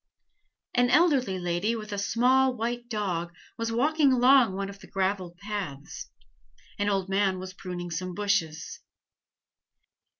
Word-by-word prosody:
An 245 0 +3
elderly 270 - +3
lady 175 +5 -1
with 215 -1 -7
a 200 - -2
small 255 +5 +3
white 240 +1 -3
dog 175 -6 -2 0.2
was 230 0 -3
walking 285 +4 +3
along 250 -4 +5
one 195 0 -3
of 200 0 -10
the 190 - -14
graveled 185 -2 -2
paths. 195 -9 -6 0.7
An 205 0 +1
old 195 -2 0
man 195 -1 +1
was 185 0 -7
pruning 180 -2 -6
some 180 +2 -4
bushes. 200 -6 -1
200 Hz, 135 wpm, -27 LUFS, 185-240 Hz, 0.7 s, along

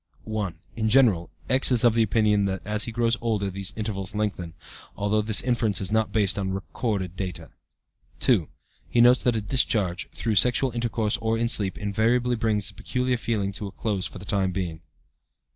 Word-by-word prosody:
"1. 105 -5 -4 0.2
In 110 -1 -1
general, 110 -9 +3 0.2
X. 130 +1 +4
is 125 -1 +4
of 120 -2 +5
the 115 - +2
opinion 105 -1 +2
that 95 -1 -3
as 105 +1 0
he 115 - -5
grows 115 0 0
older 105 -4 -1
these 100 +2 -2
intervals 105 -3 -4
lengthen, 100 -6 -3 0.4
though 105 +1 +1
this 105 0 +5
inference 115 -5 +1
is 95 -1 -3
not 110 0 +1
based 100 -2 0
on 95 -1 -2
recorded 95 -2 -3
data. 85 -6 -6 0.7
"2. - - +2 0.4
He 120 - 0
notes 125 +2 +6
that 120 -2 +1
a 110 - -1
discharge 105 -5 +1
(through 115 - -3
sexual 125 +5 +3
intercourse 115 -2 -1
or 115 0 -1
in 115 0 0
sleep) 100 -5 +1
invariably 115 +4 +1
brings 110 -3 0
the - - -3
peculiar 125 0 -2
feeling 110 -4 -2
to 100 +1 -5
a - - -8
close 100 -3 -2
for - - -11
the 95 - -9
time 100 -3 0
being. 85 -4 -4
105 Hz, 190 wpm, -25 LUFS, 100-115 Hz, 0.7 s, notes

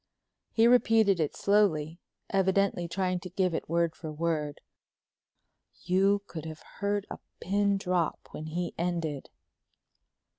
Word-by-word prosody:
He 225 - +3
repeated 225 -5 +4
it 155 -3 -1
slowly, 175 -6 +2 0.3
evidently 195 -2 +2
trying 180 +1 -1
to 185 - -8
give 185 -1 0
it 160 - -4
word 170 -1 +1
for 160 -2 -7
word. 150 -2 -2 1.2
You 195 +2 +2
could 160 -5 -8
have 160 0 -8 0.2
heard 205 0 0
a - - -6 0.2
pin 200 +1 +1
drop 180 -4 0
when 155 - -7
he 175 +2 -3
ended. 165 -5 -2
180 Hz, 125 wpm, -29 LUFS, 160-200 Hz, 1.2 s, repeated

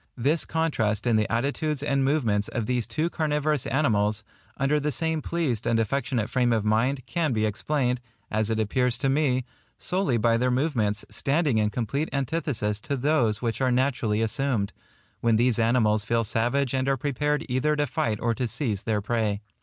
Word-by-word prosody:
This 145 +7 +2
contrast 115 -11 0
in 120 -2 +3
the 105 -2 +1
attitudes 140 +4 -1
and 140 -2 +1
movements 115 -8 +1
of 115 - -3
these 125 -1 -1
two 160 +2 -1
carnivorous 150 -3 0
animals, 110 -5 +2 0.3
under 140 +3 +2
the 150 +1 -1
same 160 +4 -1
pleased 145 -10 -2
and 115 - +2
affectionate 120 -1 -1
frame 125 -2 +1
of 110 -2 +1
mind, 120 +5 +1
can 165 -6 -1
be 110 -1 +1
explained, 125 +3 0 0.3
as 110 0 0
it 110 -1 0
appears 125 +3 +1
to 135 - 0
me, 135 -3 +1 0.3
solely 180 -9 0
by 115 +1 +3
their 125 +2 +1
movements 125 -6 0
standing 140 -4 +1
in 105 -1 +2
complete 125 +7 -2
antithesis 135 -7 -1
to 140 - -3
those 125 -6 +1
which 115 +1 -2
are 130 -1 +2
naturally 125 -4 +1
assumed, 115 -3 -1 0.5
when 115 -1 +2
these 120 0 +3
animals 110 -2 +2
feel 115 +1 +1
savage 120 +5 0
and 130 0 0
are 135 - +2
prepared 150 +3 -1
either 135 +4 +1
to 145 0 +1
fight 110 -5 -1
or 115 0 +1
to 125 +2 -2
seize 110 -4 -2
their 110 -2 -1
prey. 105 -2 -1
125 Hz, 180 wpm, -26 LUFS, 110-145 Hz, 0.5 s, in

